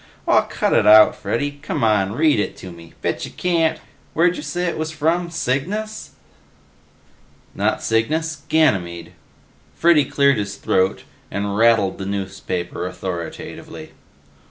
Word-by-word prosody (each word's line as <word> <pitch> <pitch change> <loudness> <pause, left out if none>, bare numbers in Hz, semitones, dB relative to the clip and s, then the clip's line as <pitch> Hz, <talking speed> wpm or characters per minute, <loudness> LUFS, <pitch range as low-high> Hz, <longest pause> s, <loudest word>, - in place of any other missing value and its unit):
"Aw, - - +5
cut - - -1
it - - +3
out, 105 0 +8
Freddy! 145 +4 -3
C'mon, 105 -3 +1
read 150 0 +3
it 105 - -2
to 95 - -9
me. 85 -1 -14
Betcha - - -2
can't! 165 -3 0 0.4
Where'd 175 +2 +3
ya - - -6
say 165 +4 -3
it 170 - -1
was 160 0 -2
from? 165 +3 0
Cygnus?" 175 - -3 1.4
"Not - - -1
Cygnus. 155 +8 0
Ganymede." 90 - +1 0.6
Freddy 165 -4 +4
cleared 140 -1 +2
his 100 -1 -4
throat 95 -1 0 0.3
and 100 0 -3
rattled 110 -3 +3
the 95 - -4
newspaper 95 -3 -4
authoritatively. 85 -3 -7
120 Hz, 130 wpm, -20 LUFS, 100-160 Hz, 1.4 s, out